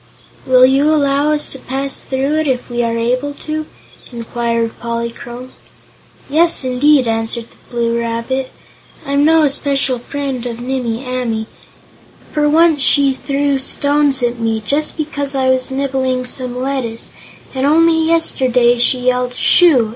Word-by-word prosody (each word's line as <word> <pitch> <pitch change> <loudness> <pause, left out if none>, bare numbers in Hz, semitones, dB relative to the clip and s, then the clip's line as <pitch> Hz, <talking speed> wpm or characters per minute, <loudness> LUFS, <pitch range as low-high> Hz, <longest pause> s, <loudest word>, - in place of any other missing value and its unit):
"Will 255 0 +6
you 275 +3 +3
allow 285 0 +2
us 300 -1 -1
to 270 - -6
pass 270 +1 -4
through 275 +3 -1
it, 315 - -1
if 250 -2 -2
we 240 0 -1
are 230 -1 -1
able 255 +5 -1
to?" 310 0 -3 0.4
inquired 235 -1 -2
Polychrome. 235 +2 -6 0.8
"Yes, 330 +2 +2
indeed," 260 +1 +3
answered 225 +1 -2
the - - -22
Blue 235 -1 -1
Rabbit. 235 +3 -3 0.6
"I'm 280 0 +1
no 320 +1 +4
especial 275 -3 0
friend 270 -1 -4
of 235 -1 -6
Nimmie 245 -1 -3
Amee, 245 -3 -2 0.9
for 295 -1 +1
once 320 -1 +4
she 275 0 +3
threw 280 +1 -1
stones 285 0 0
at 240 0 -1
me, 225 -1 -1
just 300 +7 -1
because 285 -3 -3
I 260 -1 +1
was 260 -1 +1
nibbling 265 -1 -1
some 250 -1 -2
lettuce, 255 -4 -2 0.4
and 260 -1 -2
only 330 +2 +4
yesterday 250 -7 +3
she 250 +1 +2
yelled 250 0 0
'Shoo!' 275 -11 +4
260 Hz, 145 wpm, -16 LUFS, 240-285 Hz, 0.9 s, Will